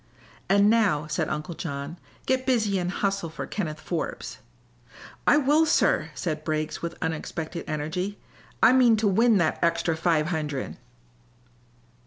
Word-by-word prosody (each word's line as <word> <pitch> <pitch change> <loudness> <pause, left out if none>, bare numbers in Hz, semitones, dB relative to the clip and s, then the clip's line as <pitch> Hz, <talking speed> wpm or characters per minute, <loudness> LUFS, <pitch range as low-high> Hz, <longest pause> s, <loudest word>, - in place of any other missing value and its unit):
"And 200 +1 +5
now," 210 -10 +3
said 155 +1 -2
Uncle 155 +3 -4
John, 145 0 -6 0.3
"get 260 0 +1
busy 215 -6 +2
and 175 0 -2
hustle 195 -2 -1
for 155 - -6
Kenneth 155 -7 -4
Forbes." 160 +1 -4 0.9
"I - - +6
will, 300 +2 +4
sir," - - +2
said 155 -3 -3
Briggs, 155 0 -2
with 170 0 -5
unexpected 160 +1 -4
energy. 180 +7 -3 0.5
"I 245 - +8
mean 245 -4 +5
to 215 0 +1
win 225 +3 +4
that 170 -4 +1
extra 170 0 +1
five 160 -1 +1
hundred!" 150 -5 -3
170 Hz, 140 wpm, -26 LUFS, 155-205 Hz, 0.9 s, I